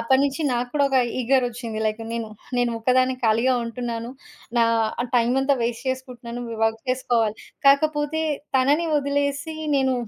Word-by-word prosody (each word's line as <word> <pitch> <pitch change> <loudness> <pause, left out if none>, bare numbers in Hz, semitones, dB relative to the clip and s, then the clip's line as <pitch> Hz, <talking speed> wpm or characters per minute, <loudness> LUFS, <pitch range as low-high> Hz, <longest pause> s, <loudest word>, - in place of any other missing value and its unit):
అప్పటి 265 +3 +3
నుంచి 280 +3 -1
నాకు 245 0 -1
కూడా 285 -1 +3
ఒక 265 - +2 0.2
ఈగరొచ్చింది. 245 -3 0
లైక్ 215 +1 -2
నేను, 230 -2 -3 0.3
నేను 245 -1 +2
ఒక్కదాన్ని 255 +2 +2
ఖాళీగా 230 +4 +3
ఉంటున్నాను, 230 0 -4 0.5
నా 230 - +5 0.5
టైమంతా 265 +4 +2
వేస్ట్ 235 +2 -3
చేసుకుంటున్నాను. 245 -2 -6
వి 225 - -5
వర్క్ 225 0 -1
చేసుకోవాలి. 230 -4 +1 0.3
కాకపోతే 295 +2 +2 0.3
తనని 290 +6 +2
వదిలేసి, 285 +2 -1 0.2
నేను 265 -1 +2
255 Hz, 135 wpm, -23 LUFS, 230-275 Hz, 0.5 s, నా